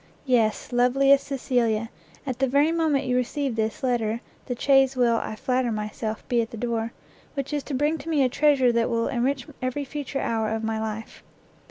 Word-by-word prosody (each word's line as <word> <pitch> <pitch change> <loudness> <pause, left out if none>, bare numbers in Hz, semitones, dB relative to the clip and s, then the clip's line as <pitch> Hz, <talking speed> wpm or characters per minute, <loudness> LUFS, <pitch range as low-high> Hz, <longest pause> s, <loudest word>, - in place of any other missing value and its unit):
Yes, 235 -4 +1
loveliest 275 +3 +4
Cecilia! 240 -5 0 0.3
at 260 -3 -4
the 270 - +2
very 285 +5 +3
moment 315 -5 +1
you 250 -1 0
receive 250 +1 -1
this 220 +4 -2
letter, 235 -3 0 0.3
the 245 -2 -4
chaise 270 -1 +4
will, 240 -2 +3
I 220 - -4
flatter 250 +2 0
myself, 215 +1 -4
be 240 -2 +2
at 225 - -4
the 230 - -8
door, 230 0 -2 0.4
which 275 +1 -3
is 295 - 0
to 280 - -3
bring 300 +4 +1
to 330 - -7
me 300 -4 +3
a - - +4
treasure 275 -1 +3
that 235 -1 +1
will 230 -1 0
enrich 260 +1 0 0.2
every 255 +3 -2
future 280 0 -4
hour 220 -1 0
of 220 0 -2
my 220 0 -1
life! 220 0 -5
250 Hz, 195 wpm, -25 LUFS, 230-275 Hz, 0.4 s, loveliest